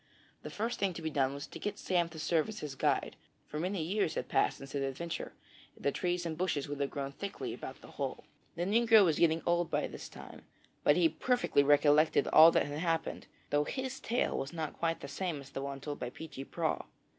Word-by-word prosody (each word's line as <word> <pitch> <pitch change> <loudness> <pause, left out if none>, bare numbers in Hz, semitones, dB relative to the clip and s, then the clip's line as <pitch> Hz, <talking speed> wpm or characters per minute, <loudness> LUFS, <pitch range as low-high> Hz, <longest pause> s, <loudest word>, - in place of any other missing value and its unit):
The - - -7
first 230 +3 -3
thing 195 -2 +1
to 165 - -7
be 160 - -2
done 135 -1 +1
was 140 - -5
to - - -10
get 205 -1 -3
Sam 175 -4 +1
to 165 - -11
serve 160 +4 +1
as 215 0 -7
his 150 -2 -5
guide, 135 - 0 0.3
for 150 - -5
many 180 0 -1
years 185 -1 0
had 125 - -3
passed - - +2
since 135 0 -10
his 140 - -2
adventure, 135 +5 -4 0.4
and - - -14
the 140 - +4
trees 175 +3 -1
and 160 -1 -2
bushes 160 -5 -1
would 145 0 -5
have 140 -1 0
grown 140 -1 -4
thickly 200 +7 -5
about - - -8
the - - -12
hole. - - -3 0.3
The 170 - -1
negro 220 +1 +6
was 160 -4 +1
getting 165 -1 +3
old 175 -1 +2
by - - 0
this - - -8
time, - - -11 0.4
but 145 - +5
he 175 -2 +5
perfectly 245 - +2
recollected 145 +2 +4
all 160 +1 +9
that - - +2
had 145 +1 -4
happened, 165 -1 -1 0.2
though 145 0 +3
his 260 - -4
tale 240 +1 0
was 135 +5 -3
not 160 -3 -3
quite 165 0 0
the - - -6
same 155 +2 -3
as 140 0 -12
the 135 - -4
one 140 0 -4
told 145 +1 -5
by 125 - -3
Peechy 135 -1 -8
Prauw. 165 +1 -2
160 Hz, 230 wpm, -32 LUFS, 145-180 Hz, 0.4 s, all